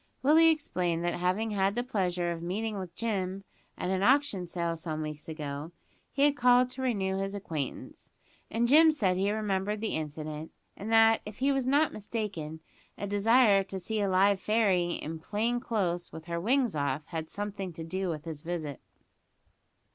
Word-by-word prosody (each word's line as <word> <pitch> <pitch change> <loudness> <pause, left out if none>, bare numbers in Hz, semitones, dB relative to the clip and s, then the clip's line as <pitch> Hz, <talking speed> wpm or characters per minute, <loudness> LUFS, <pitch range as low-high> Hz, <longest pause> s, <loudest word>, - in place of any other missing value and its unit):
Willie 315 +4 +6
explained 175 - 0
that, 175 - +1
having 185 +5 0
had 195 0 +1
the 245 - 0
pleasure 180 -7 -1
of 165 -1 -5
meeting 205 +4 -3
with 180 -2 -7
Jim 195 -4 -2 0.3
at 180 - -2
an 190 0 0
auction 245 -6 +2
sale 170 -1 -2
some 155 -1 -4
weeks 150 +1 -7
ago, 150 +1 -5 0.4
he 275 - +1
had 290 0 +5
called 250 0 +4
to 260 +1 -7
renew 195 -7 0
his 195 +1 -3
acquaintance; 160 -8 -5 0.4
and 230 +2 +1
Jim 315 +5 +7
said 200 -12 +1
he 195 +2 +1
remembered 210 -1 -1
the 220 0 -2
incident 155 0 -5 0.2
and 215 +3 -6
that, 225 0 +6
if 210 -1 -9
he 275 +2 +2
was 270 -2 0
not 290 +3 +3
mistaken, 200 -8 -5 0.4
a - - -4
desire 205 0 +4
to 195 - -5
see 215 +3 -2
a 200 - +1
live 190 +1 +4
fairy 190 -5 +2
in 160 +1 -5
plain 225 +8 -1
clo'se, 185 -8 -2
with 160 0 -9
her 170 -1 -3
wings 245 - +1
off, 145 0 -1
had 160 -1 -5
something 200 -2 -5
to 160 - -7
do 185 +3 -3
with 155 -1 -4
his 160 -3 -6
visit. 160 -4 -5
195 Hz, 180 wpm, -29 LUFS, 170-225 Hz, 0.4 s, Jim